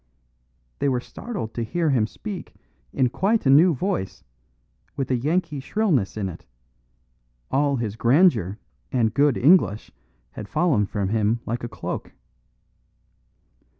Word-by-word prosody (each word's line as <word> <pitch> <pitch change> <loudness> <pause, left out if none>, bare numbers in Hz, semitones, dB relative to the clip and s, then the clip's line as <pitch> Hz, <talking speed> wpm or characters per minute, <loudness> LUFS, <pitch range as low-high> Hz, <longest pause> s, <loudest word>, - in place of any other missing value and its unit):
They 140 - +1
were 125 -2 +1
startled 175 - -6
to 120 - -3
hear 155 +7 0
him 115 -5 +2
speak 205 - -8 0.4
in 130 -2 +1
quite 205 - 0
a 135 - +5
new 160 +4 +6
voice, 155 - -3 0.7
with 135 -1 -3
a - - +3
Yankee 150 +4 -1
shrillness 140 - 0
in 100 -2 -2
it; 85 -3 -8 1.1
all 140 +1 +2
his 110 -5 -3
grandeur 120 - +3 0.3
and 115 -4 +1
good 145 -2 +3
English 135 - +3 0.4
had 105 +8 -9
fallen 150 - +2
from 100 -2 -2
him 110 +2 +1
like 120 +2 -3
a 120 - -4
cloak. - - -6
130 Hz, 135 wpm, -23 LUFS, 110-165 Hz, 1.1 s, new